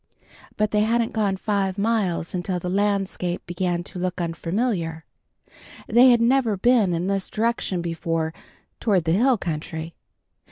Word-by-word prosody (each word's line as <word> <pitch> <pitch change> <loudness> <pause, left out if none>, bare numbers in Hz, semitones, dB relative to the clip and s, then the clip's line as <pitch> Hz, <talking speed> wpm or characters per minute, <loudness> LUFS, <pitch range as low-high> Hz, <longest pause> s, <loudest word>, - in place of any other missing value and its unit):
But 215 0 +1
they 210 - +2
hadn't 230 +2 +1
gone 205 -3 0
five 195 -1 -1
miles 200 -6 0
until 180 0 -2
the 180 0 -4
landscape 195 -3 -1
began 175 0 -2
to 180 - -8
look 180 0 -2
unfamiliar. 170 0 -2 0.8
They 245 +3 +6
had 240 -2 +5
never 235 -3 +2
been 215 -4 +3
in 170 +2 -2
this 195 0 -1
direction 215 -5 -1
before, 165 -1 -2 0.5
toward 195 -6 +2
the 160 - 0
hill 240 +7 +3
country. 160 -1 -5
190 Hz, 145 wpm, -23 LUFS, 175-220 Hz, 0.8 s, They